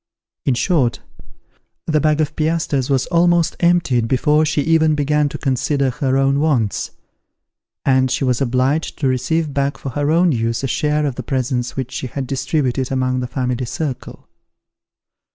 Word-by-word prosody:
In 130 - +3
short, 125 -2 +1 0.8
the 155 -2 +1
bag 155 0 +2
of 150 -1 -2
piastres 155 -4 0
was 135 -2 +1
almost 175 -1 +3
emptied 170 -10 +2
before 150 +5 +2
she 150 -1 0
even 160 0 +3
began 150 0 +1
to 150 - -6
consider 135 0 0
her 135 -1 0
own 135 +1 +2
wants; 130 -9 0 1.0
and 130 -1 +3
she 130 - -1
was 125 -1 0
obliged 130 +4 0
to 140 - 0
receive 145 +4 0
back 140 0 -1
for 135 - -6
her 145 +3 -1
own 170 +2 +3
use 115 -1 -1
a - - 0
share 150 +4 0
of 135 -4 -3
the - - -3
presents 125 0 -2
which 130 -1 -4
she 130 - -4
had 135 +2 -4
distributed 135 -1 -1
among 130 -1 0
the 125 - -3
family 125 0 -2
circle. 135 +1 -5
135 Hz, 165 wpm, -19 LUFS, 130-155 Hz, 1.0 s, In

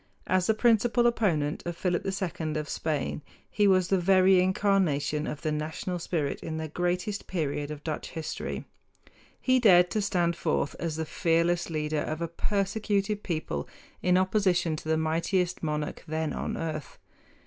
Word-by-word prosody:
As 185 -1 +2
the 220 - +3
principal 235 +1 +3
opponent 175 -11 +1
of 175 -1 -5
Philip 175 -1 0
II 175 -5 -3
of 150 -1 -3
Spain 150 -1 -2 0.3
he 205 -1 +3
was 185 -2 +3
the 195 - +3
very 185 0 +5
incarnation 185 -6 +1
of 150 - -5
the 155 - 0
national 160 +4 -3
spirit 160 -4 -2
in 160 -1 -4
the 160 0 -3
greatest 180 +5 -2
period 145 -4 -2
of 150 -1 -7
Dutch 155 -2 -4
history. 160 -1 -5 0.7
He 255 0 +3
dared 180 -6 +6
to 215 - 0
stand 175 -4 +1
forth 155 -3 -1
as 165 -2 -2
the 160 0 -2
fearless 170 +1 +1
leader 155 -1 -1
of 155 +1 -3
a 170 - -1
persecuted 205 +3 -1
people 155 - -3 0.3
in 180 0 +3
opposition 185 -4 +2
to 155 - -7
the 160 - +3
mightiest 170 +3 0
monarch 150 -1 -3
then 160 0 -2
on - - -3
earth. 155 -3 -5
175 Hz, 160 wpm, -28 LUFS, 155-190 Hz, 0.7 s, dared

